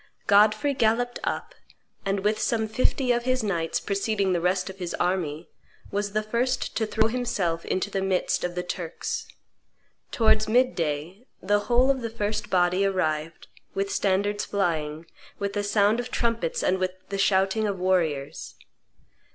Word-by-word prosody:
Godfrey 215 +7 +4
galloped 245 0 +1
up, - - -3 0.5
and, 195 0 0
with 210 +2 +1
some 220 0 0
fifty 255 +3 +1
of 240 0 0
his 255 -2 +1
knights, 170 -6 -1
preceding 200 -1 0
the 175 - 0
rest 180 +1 +1
of 190 0 -8
his 175 -2 -3
army, 170 -3 -1 0.4
was 205 0 -2
the 215 0 +1
first 245 +3 -1
to 220 - 0
throw 220 +1 +2
himself 215 -9 -1
into 185 +2 -1
the 195 - -1
midst 190 -1 0
of 180 0 -2
the 180 - -2
Turks. 175 -2 -4 0.8
Towards 220 -1 +3
mid 250 +3 +4
day 165 - -3
the 205 +2 +2
whole 250 +3 +5
of 265 -2 -2
the 230 - -3
first 215 -1 -3
body 180 +1 +3
arrived, 165 -4 -1 0.3
with 195 0 -1
standards 205 +1 +1
flying, 160 -5 -1 0.3
with 200 0 -3
the 205 - -1
sound 205 +2 +3
of 245 0 -4
trumpets 230 -9 -1
and 185 +1 +2
with 185 0 -1 0.2
the 195 0 -3
shouting 195 +2 +2
of 200 -2 -2
warriors. 165 -7 -1
200 Hz, 160 wpm, -26 LUFS, 180-220 Hz, 0.8 s, whole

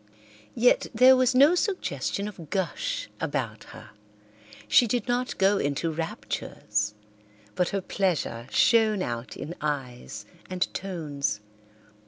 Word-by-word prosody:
Yet 245 +2 +4
there 255 +3 +8
was 255 0 +3
no 285 +6 +7
suggestion 360 - -1
of 175 -7 -9
gush 190 -4 -2
about - - -3
her; - - -12 0.8
she 240 - +5
did 240 0 -1
not 245 +1 -1
go 195 +1 +3
into 145 +4 -1
raptures, 105 -9 -3 0.6
but 180 +7 +1
her 195 - -1
pleasure 170 - -1
shone 215 -1 +4
out 120 -2 -5
in 155 +5 -6
eyes 125 -7 -4 0.2
and 185 -1 -1
tones. 155 - -3
185 Hz, 120 wpm, -27 LUFS, 140-230 Hz, 0.8 s, there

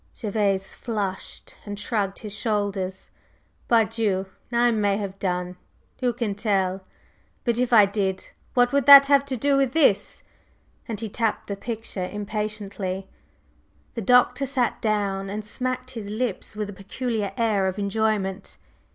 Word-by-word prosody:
Gervase 200 -3 0
flushed, 205 -5 -5
and 205 -1 -6
shrugged 205 -2 -2
his 210 -2 -7
shoulders. 200 -4 -2 0.6
"Pardieu! 220 -4 +2 0.3
I 240 0 +3
may 205 -3 +1
have 195 -2 -5
done! 180 -1 -2 0.4
Who 250 -1 +1
can 230 -3 -2
tell? 195 -3 0 0.6
But 235 -1 0
if 250 -1 +1
I 215 -4 +8
did, 195 -2 -2 0.3
what 245 -1 +4
would 280 -2 +1
that 280 -1 +11
have 280 0 +4
to 265 -2 -3
do 280 +4 +2
with 270 -2 +1
this?" 280 -11 +2 0.6
and 225 -4 -4
he 225 - -3
tapped 225 +1 -1
the 200 - -4
picture 210 -4 -5
impatiently. 205 -2 -4 0.8
The 230 - -4
Doctor 250 +5 +4
sat 255 -3 0
down 200 -3 -1
and 210 +1 -5
smacked 255 +3 -4
his 220 -5 -7
lips 220 -1 -3
with 210 -1 -3
a - - -10
peculiar 205 +1 -3
air 210 -4 +2
of 190 +1 -3
enjoyment. 205 -1 -1
210 Hz, 145 wpm, -24 LUFS, 195-235 Hz, 0.8 s, that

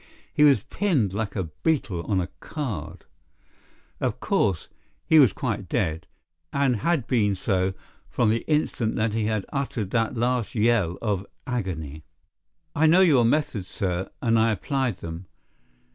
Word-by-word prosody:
He - - 0
was 145 -2 +5
pinned 135 - 0
like 100 0 -3
a 95 - 0 0.2
beetle 125 - 0
on 100 -3 +1
a 90 0 -2
card. 95 - -5 0.9
Of - - -1
course, 95 -6 0 0.4
he 160 -2 +6
was 130 -9 +7
quite - - -3
dead, 80 +1 -1 0.4
and 135 -4 +2
had 150 +3 0
been 105 -6 +2
so 95 -1 0 0.3
from 105 - +2
the 115 +1 0
instant 125 -7 0
that 110 0 0
he 110 -1 0
had 110 -2 -1
uttered 125 -8 -2
that 115 0 0
last 120 -1 0
yell 105 -6 +2
of 100 -3 -1 0.2
agony. 85 - -4 0.7
"I 160 +1 +4
know 175 +4 +6
your 140 -10 +5
methods, 115 -7 0
sir, 95 -1 -2
and 115 -2 +3
I 115 +1 +3
applied 130 0 -1
them. 85 +2 -7
110 Hz, 150 wpm, -25 LUFS, 95-130 Hz, 0.9 s, was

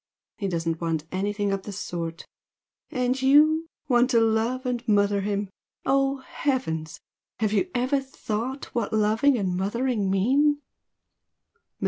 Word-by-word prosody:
He 200 - -1
doesn't 165 -2 -2
want 165 -2 -1
anything 205 +2 -1
of 195 0 -1
the 205 - -7
sort! 170 -4 -5 0.6
And 255 -2 0
YOU 305 +4 +5 0.2
want 250 -1 +4
to 240 -3 +4
love 225 +3 +1
and 245 -1 -1
mother 205 -1 +3
him! 200 0 -2 0.3
Oh 275 0 +2
heavens! 160 - -2 0.4
have 215 0 0
you 360 - +1
ever 255 +3 +2
thought 265 -1 -5
what 230 -3 -1
loving 220 +6 +3
and 190 -4 -1
mothering 210 +2 0
mean?" 275 +10 +3
220 Hz, 130 wpm, -25 LUFS, 195-265 Hz, 0.6 s, YOU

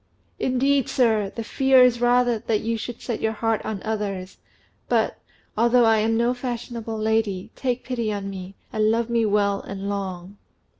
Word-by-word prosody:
"Indeed, 270 +1 +1
sir, 220 -6 +2
the 230 - -3
fear 265 +2 +4
is 245 -1 +3
rather 245 -1 +3
that 220 -1 -1
you 230 +1 -1
should 235 +1 -6
set 235 -3 -3
your 220 0 0
heart 225 0 -1
on 210 -3 -4
others; 200 -4 -4 0.5
but, - - +1 0.4
although 235 +2 +4
I 225 -1 +5
am 225 +1 +1
no 235 +1 +2
fashionable 240 -2 -5
lady, 215 -3 0
take 250 -2 -2
pity 235 -4 -2
on 200 -1 -4
me, 190 0 -7 0.2
and 215 -1 +2
love 230 +1 0
me 230 -2 +2
well 200 -1 +1
and 200 0 -6
long." 195 -1 -5
225 Hz, 170 wpm, -24 LUFS, 205-240 Hz, 0.5 s, I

